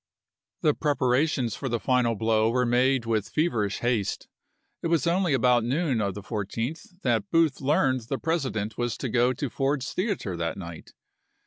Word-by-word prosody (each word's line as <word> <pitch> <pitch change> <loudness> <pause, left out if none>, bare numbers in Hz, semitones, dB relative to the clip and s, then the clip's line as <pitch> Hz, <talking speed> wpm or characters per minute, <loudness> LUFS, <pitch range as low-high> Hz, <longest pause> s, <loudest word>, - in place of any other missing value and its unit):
The 150 - +3
preparations 135 -4 +1
for 135 - -4
the 120 0 -1
final 125 -2 +2
blow 110 +1 +2
were 125 +1 +1
made 125 +1 +2
with 110 -3 -1
feverish 115 - 0
haste; 120 -5 -1 0.5
it - - -1
was 165 -4 +1
only 175 -1 +2
about 125 -2 +3
noon 135 -1 0
of 100 -2 -1
the 105 - -7
14th 120 - -5
that 115 -5 +1
Booth 165 -5 +2
learned 135 -2 +2
the 135 - -1
President 130 -11 -2
was 120 -2 -1
to 130 - -3
go 120 +2 +3
to 140 +3 -3
Ford's 135 +1 -1
Theater 185 - -2
that 85 +1 -3
night. 85 -4 -9
125 Hz, 165 wpm, -26 LUFS, 110-145 Hz, 0.5 s, The